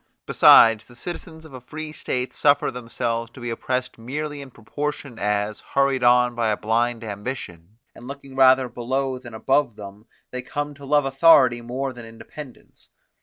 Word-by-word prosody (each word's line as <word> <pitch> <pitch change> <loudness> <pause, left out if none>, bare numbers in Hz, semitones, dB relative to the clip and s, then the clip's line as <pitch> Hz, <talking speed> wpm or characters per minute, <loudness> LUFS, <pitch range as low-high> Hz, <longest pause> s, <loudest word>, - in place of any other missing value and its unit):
Besides, 115 -1 +6
the 120 - -17
citizens 160 +3 -8
of 155 - -14
a 130 - -9
free 155 +4 -7
state 125 -4 -3
suffer 145 -1 +2
themselves 115 -1 -3
to - - -12
be 120 -1 -4
oppressed 125 +1 -3
merely 145 +5 -5
in 140 - -10
proportion 140 +1 -6
as, 105 +1 -1
hurried 135 -2 0
on 125 0 +4
by 120 -1 -1
a 105 - 0
blind 115 +2 -1
ambition, 105 -4 -7 0.2
and 120 - -13
looking 140 -1 -10
rather 130 -1 +5
below 130 +2 -3
than 120 -3 -11
above 130 +1 +1
them, 105 +2 -11 0.2
they 125 - -4
come 145 +2 -4
to 140 0 -13
love 145 0 +2
authority 135 -4 +5
more 130 +3 -4
than 120 -2 -11
independence. 125 +4 -13
125 Hz, 170 wpm, -23 LUFS, 115-140 Hz, 0.2 s, Besides